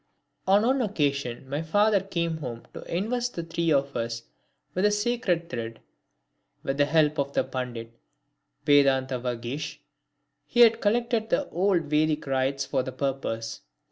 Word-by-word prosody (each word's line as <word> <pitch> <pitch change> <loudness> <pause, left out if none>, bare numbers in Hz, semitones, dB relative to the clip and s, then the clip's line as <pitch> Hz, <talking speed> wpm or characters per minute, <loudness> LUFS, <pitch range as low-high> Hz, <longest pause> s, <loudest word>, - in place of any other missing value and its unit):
On 200 +3 +5
one 260 +2 +3
occasion 140 - -1
my 145 +3 -2
father 205 +5 +3
came 170 -4 -2
home 120 -6 -6
to - - -7
invest 240 +7 -1
the 170 - -3
three 165 0 -1
of 140 -1 +1
us 115 0 -3 0.5
with 185 - 0
the 210 - +6
sacred 210 -5 0
thread. 115 -5 -5 0.8
With 135 - -2
the 145 - +5
help 155 -1 +3
of 140 0 -1 0.2
Pandit 120 -3 -4 0.7
Vedantavagish 130 -2 +1 0.7
he 240 - +3
had 230 -1 +7
collected 230 +1 +1
the 290 - +1
old 185 -1 +2
Vedic 150 +1 +1
rites 135 0 0
for 135 -1 0
the 130 - -5
purpose. 130 -4 -3
150 Hz, 140 wpm, -27 LUFS, 130-200 Hz, 0.8 s, had